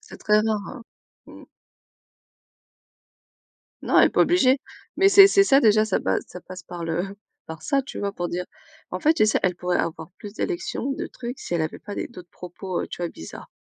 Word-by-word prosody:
c'est 430 Hz, -, -13 dB
très 210 Hz, 0 st, +3 dB
rare, 215 Hz, -1 st, 0 dB
hein. 250 Hz, -4 st, -9 dB, 0.4 s
Mmh. -, -, -13 dB, 2.4 s
Non, -, -, +4 dB
elle -, -, +7 dB
est -, -, -5 dB
pas -, -, +2 dB
obligée, 270 Hz, -7 st, +4 dB, 0.4 s
mais 390 Hz, -, +4 dB
c'est 395 Hz, 0 st, +9 dB
c'est 395 Hz, 0 st, +5 dB
ça, 275 Hz, -7 st, +5 dB
déjà, 215 Hz, -3 st, +4 dB
ça 205 Hz, -, 0 dB
pas 95 Hz, -, 0 dB
ça 180 Hz, -, -11 dB
passe 185 Hz, -1 st, -10 dB
par 175 Hz, -1 st, -8 dB
le 175 Hz, +4 st, -3 dB, 0.3 s
par 160 Hz, -1 st, -9 dB
ça, 275 Hz, -, +1 dB
tu -, -, -8 dB
vois? 200 Hz, 0 st, -2 dB
Pour 175 Hz, -3 st, -4 dB
dire 180 Hz, +1 st, -4 dB, 0.4 s
en -, -, -4 dB
fait, 315 Hz, +1 st, +4 dB
tu 215 Hz, -, +3 dB
sais, -, -, +2 dB
elle 180 Hz, -1 st, +1 dB
pourrait 180 Hz, 0 st, -1 dB
avoir 160 Hz, +1 st, -3 dB
plus 205 Hz, -1 st, -9 dB
d'élections, 350 Hz, -, -3 dB
de 335 Hz, +5 st, -4 dB
trucs 245 Hz, +1 st, -7 dB
si -, -, -6 dB
elle 170 Hz, -, +1 dB
avait 155 Hz, -, -3 dB
pas 205 Hz, -, -8 dB
des -, -, -4 dB
d'autres 180 Hz, -7 st, -13 dB
propos, 180 Hz, +1 st, -6 dB
heu, -, -, -5 dB
tu -, -, -8 dB
vois, 170 Hz, -, -1 dB
bizarres. 80 Hz, -, -10 dB
205 Hz, 215 wpm, -24 LUFS, 175-275 Hz, 2.4 s, c'est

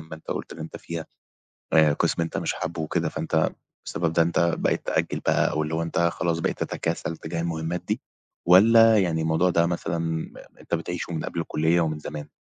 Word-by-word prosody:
ما 80 Hz, 0 st, -9 dB
أنت 80 Hz, -, -15 dB
قُلت -, -, -4 dB
إن -, -, -11 dB
أنت 80 Hz, 0 st, -7 dB
فيها، 85 Hz, -1 st, -6 dB, 0.7 s
آآ 80 Hz, -2 st, +6 dB
قِسم 85 Hz, -, 0 dB
أنت 80 Hz, -, -3 dB
مش -, -, -1 dB
حابه 80 Hz, 0 st, -4 dB
وكده 80 Hz, -, -1 dB
فأنت 80 Hz, -1 st, 0 dB, 0.4 s
بسبب 80 Hz, 0 st, -1 dB
ده 85 Hz, -, +4 dB
أنت 85 Hz, 0 st, +2 dB
بقيت -, -, 0 dB
تأجل -, -, 0 dB
بقى -, -, +2 dB
أو 75 Hz, -, 0 dB
اللي 75 Hz, +1 st, -3 dB
هو 80 Hz, -, 0 dB
أنت 85 Hz, -, -2 dB
خلاص 85 Hz, 0 st, +1 dB
بقيت -, -, -1 dB
تتكاسل 80 Hz, 0 st, -3 dB
تجاه 85 Hz, +1 st, -4 dB
المهمات 85 Hz, +1 st, -2 dB
دي -, -, 0 dB, 0.5 s
والّا 110 Hz, +4 st, +7 dB
يعني 85 Hz, -4 st, +1 dB
الموضوع 80 Hz, +3 st, +2 dB
ده 85 Hz, -1 st, +3 dB
مثلًا 85 Hz, -1 st, -2 dB
م 80 Hz, -1 st, -3 dB, 0.3 s
أنت -, -, -3 dB
بتعيشه 85 Hz, +1 st, -3 dB
من 80 Hz, -, -3 dB
قبل 85 Hz, -, -3 dB
الكلّية 80 Hz, +1 st, +1 dB
ومن 80 Hz, -2 st, -1 dB
زمان؟ 75 Hz, -1 st, -7 dB
80 Hz, 205 wpm, -25 LUFS, 80-85 Hz, 0.7 s, والّا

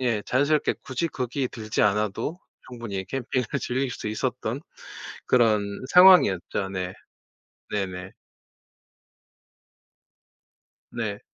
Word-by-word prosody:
예 115 Hz, -5 st, +1 dB
자연스럽게 145 Hz, +6 st, +1 dB
굳이 135 Hz, +6 st, -2 dB
거기에 130 Hz, -1 st, -2 dB
들지 110 Hz, -2 st, -3 dB
않아도 105 Hz, -, 0 dB, 0.3 s
충분히 115 Hz, -6 st, -5 dB
캠핑을 130 Hz, 0 st, -2 dB
즐길 130 Hz, +1 st, -1 dB
수 110 Hz, -, -6 dB
있었던 110 Hz, -, -2 dB, 0.7 s
그런 115 Hz, -4 st, +4 dB, 0.3 s
상황이었죠. 105 Hz, -, +6 dB
네. 95 Hz, -1 st, -4 dB, 0.8 s
네네. 95 Hz, -2 st, -3 dB, 2.8 s
네. -, -, -4 dB
115 Hz, 205 characters per minute, -25 LUFS, 100-130 Hz, 2.8 s, 상황이었죠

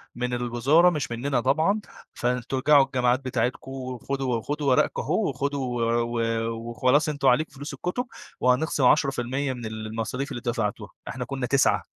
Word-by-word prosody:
من 125 Hz, 0 st, -2 dB
الوزارة 125 Hz, +8 st, +3 dB
مش 150 Hz, -7 st, -3 dB
مننا 125 Hz, +2 st, 0 dB
طبعًا، 160 Hz, -, +2 dB, 0.3 s
فأنتم 125 Hz, +2 st, -1 dB
ارجعوا 140 Hz, 0 st, +5 dB
الجامعات 125 Hz, -1 st, +1 dB
بتاعتكم، 130 Hz, +1 st, -2 dB
وخدوا 130 Hz, 0 st, -3 dB
وخدوا 145 Hz, +4 st, -2 dB
ورقكم 130 Hz, -, +2 dB
أهو 220 Hz, -, 0 dB
وخدوا 130 Hz, -2 st, -2 dB
و 115 Hz, +1 st, +2 dB, 0.5 s
و 115 Hz, +1 st, -5 dB
وخلاص 140 Hz, +7 st, +2 dB
أنتم 140 Hz, -2 st, 0 dB
عليكم 140 Hz, +6 st, +3 dB
فلوس 145 Hz, +3 st, -7 dB
الكُتُب، 245 Hz, +8 st, -3 dB, 0.3 s
وهنخصِم 130 Hz, +3 st, +2 dB
10% 135 Hz, -1 st, +2 dB
من 120 Hz, -2 st, -7 dB
المصاريف 110 Hz, +5 st, -4 dB
اللي 120 Hz, -, -5 dB
دفعتوها، 115 Hz, -4 st, -2 dB, 0.2 s
إحنا 125 Hz, +2 st, -4 dB
كنّا 135 Hz, -1 st, -3 dB
9 140 Hz, +1 st, +2 dB
130 Hz, 150 wpm, -25 LUFS, 120-140 Hz, 0.5 s, ارجعوا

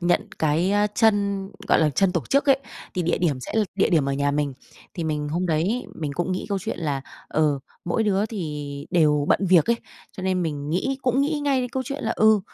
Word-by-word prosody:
nhận 175 Hz, 0 st, +2 dB
cái, 160 Hz, +5 st, +2 dB
ơ, 205 Hz, 0 st, +3 dB
chân, 200 Hz, -3 st, +2 dB, 0.2 s
gọi -, -, +5 dB
là, 155 Hz, -1 st, +3 dB
chân 190 Hz, +4 st, +2 dB
tổ 170 Hz, -, 0 dB
chức 280 Hz, +1 st, +3 dB
ấy, 270 Hz, 0 st, +6 dB, 0.4 s
thì 180 Hz, -, 0 dB
địa 170 Hz, +1 st, 0 dB
điểm 150 Hz, -7 st, 0 dB
sẽ -, -, -7 dB
là 220 Hz, -1 st, +3 dB
địa 200 Hz, -, +2 dB
điểm 150 Hz, -5 st, +3 dB
ở -, -, 0 dB
nhà 140 Hz, +1 st, +1 dB
mình. 145 Hz, -1 st, 0 dB, 0.4 s
Thì 170 Hz, -3 st, -3 dB
mình 150 Hz, -1 st, -2 dB
hôm 175 Hz, +4 st, -1 dB
đấy 175 Hz, +10 st, 0 dB
mình 150 Hz, -3 st, -4 dB
cũng 175 Hz, +1 st, -1 dB
nghĩ 185 Hz, -, -3 dB
câu 200 Hz, -1 st, 0 dB
chuyện 185 Hz, -, -4 dB
là, 145 Hz, -5 st, -1 dB, 0.3 s
ờ, 150 Hz, -3 st, +2 dB, 0.3 s
mỗi 175 Hz, +6 st, 0 dB
đứa 205 Hz, 0 st, +1 dB
thì 150 Hz, -8 st, -5 dB
đều 150 Hz, -4 st, +3 dB
bận 195 Hz, -, +3 dB
việc 175 Hz, -3 st, +6 dB
ấy, 235 Hz, -, +3 dB, 0.4 s
cho 185 Hz, -, -8 dB
nên 185 Hz, -1 st, +1 dB
mình 145 Hz, -2 st, -3 dB
nghĩ 265 Hz, +11 st, -1 dB
cũng 255 Hz, +1 st, +2 dB
nghĩ 295 Hz, +1 st, 0 dB
ngay 275 Hz, -3 st, +2 dB
đến 250 Hz, -, -2 dB
câu 260 Hz, +2 st, -2 dB
chuyện 280 Hz, +3 st, -5 dB
là, -, -, 0 dB
ừ, 220 Hz, -1 st, +5 dB
180 Hz, 240 wpm, -24 LUFS, 150-210 Hz, 0.4 s, ấy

